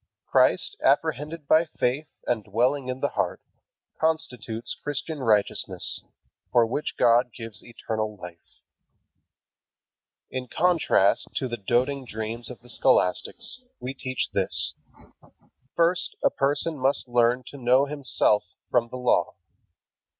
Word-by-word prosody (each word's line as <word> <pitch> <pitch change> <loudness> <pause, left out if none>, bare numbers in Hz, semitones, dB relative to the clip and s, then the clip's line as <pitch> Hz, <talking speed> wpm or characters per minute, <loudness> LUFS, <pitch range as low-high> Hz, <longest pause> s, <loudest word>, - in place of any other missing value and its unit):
Christ, - - +3
apprehended 155 0 0
by 160 +2 +5
faith 135 +5 0 0.2
and 115 -3 0
dwelling 125 +6 0
in 130 +1 -4
the 145 - +1
heart, - - -2 0.6
constitutes 125 -9 -2
Christian 145 +1 -4
righteousness, 110 -5 0 0.5
for 120 -1 +5
which 135 +6 -3
God 120 +1 +4
gives 115 -1 -8
eternal 110 -2 -4
life. 90 -2 -13 1.7
In 130 -1 -4
contrast 165 - +2
to 130 - -1
the 120 - -3
doting 125 +6 0
dreams 110 +1 -5
of 125 - -10
the 120 - -17
scholastics, 135 - +1 0.2
we 130 +1 -5
teach 130 -1 -3
this: - - +5 1.0
First 170 +1 +1
a - - +4
person 145 +2 -1
must 135 +1 +1
learn 120 +1 +2
to 140 - -10
know 130 +2 +3
himself 140 -7 +1 0.3
from 120 -1 +2
the 130 - -6
Law. 125 -1 +1
125 Hz, 120 wpm, -25 LUFS, 115-145 Hz, 1.7 s, by